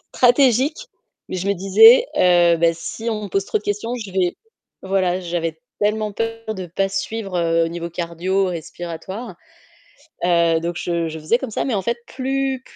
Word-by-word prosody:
stratégique 260 +3 +4 0.5
mais - - -3
je 185 +1 -3
me 200 - +3
disais: 445 - +7
«Heu, 175 -1 +5
bah 170 0 +3
si 220 +7 -5
on 215 -2 -3
me - - -4
pose 195 +1 0
trop 200 - -1
de 210 - -12
questions, 210 +4 -2
je 215 -5 -7
vais» 185 -2 0 0.4
voilà, 190 -1 0
j'avais 170 -3 -3 0.2
tellement 210 0 0
peur 225 0 -4
de 185 -2 -6
pas 195 +4 -1
suivre, 195 0 -3
heu, 165 -1 +2
au - - -2
niveau 170 0 -5
cardio-respiratoire, 175 +3 -3 0.9
heu, 170 -2 +3
donc 170 +1 -3
je 170 -1 -1
je 160 0 -6
faisais 155 +10 +1
comme 265 -3 -5
ça - - -2
mais 255 - -1
en 195 - -1
fait, 235 +5 -1
plus 270 0 -2
190 Hz, 180 wpm, -21 LUFS, 170-225 Hz, 0.9 s, disais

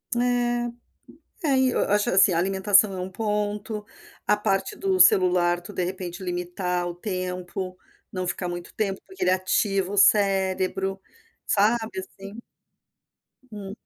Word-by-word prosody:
É, 240 -1 -1 0.6
é 270 -2 +3
e 260 0 +3
eu - - +1
acho, 205 0 +2
assim, 190 0 +5
a - - +1
alimentação 195 +2 +3
é 185 - -5
um 185 +1 -4
ponto, 210 +1 -3 0.4
a 210 - +5
parte 195 -2 -1
do 190 -1 0
celular 180 -1 +4
tu 200 +4 -10
de 185 - -2
repente 185 0 -6
limitar 180 0 -2
o 175 - -4
tempo, 185 -1 -4 0.3
não 185 -1 -3
ficar 180 0 -3
muito 175 0 -7
tempo, 195 -3 -1
porque 380 - -5
ele 180 - +3
ativa 190 +1 0
o - - -3
cérebro, 195 -1 +2 0.5
sabe, 215 -1 +1
assim 195 +2 -10 1.1
hum. 200 -2 -7
195 Hz, 145 wpm, -25 LUFS, 185-210 Hz, 1.1 s, assim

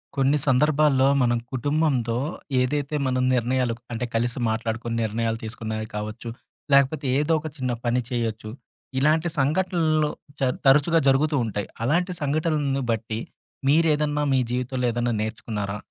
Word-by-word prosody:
కొన్ని 135 +2 +3
సందర్భాల్లో 140 0 +4 0.2
మనం 120 -1 +2
కుటుంబంతో 135 -3 0 0.5
ఏదైతే 145 +3 -1
మనం 130 -1 +1
నిర్ణయాలు 125 0 +1 0.2
అంటే 120 +2 -2
కలిసి 120 +2 0
మాట్లాడుకొని 115 +1 -2
నిర్ణయాలు 115 +1 -1
తీసుకున్నవి 110 -1 -4
కావచ్చు. 105 +2 -5 0.4
లేకపోతే 140 +2 +3
ఏదో 150 +2 +1
ఒక 155 - -6
చిన్న 130 -2 -1
పని 120 +1 +2
చేయొచ్చు. 115 -3 -3 0.5
ఇలాంటి 155 +4 +2
సంఘటనలు 155 0 +1 0.3
చ 130 - +2 0.2
తరచుగా 145 +5 +5
జరుగుతూ 145 +3 +3
ఉంటాయి. 105 -2 -3 0.2
అలాంటి 175 +8 +1
సంఘటనలను 145 -2 0
బట్టి 110 0 -2 0.5
మీరేదన్నా 150 -1 +2
మీ 130 - +4
జీవితంలో 125 +1 -1
ఏదన్నా 120 0 -1
నేర్చుకున్నారా? 105 -2 -4
130 Hz, 125 wpm, -24 LUFS, 115-150 Hz, 0.5 s, తరచుగా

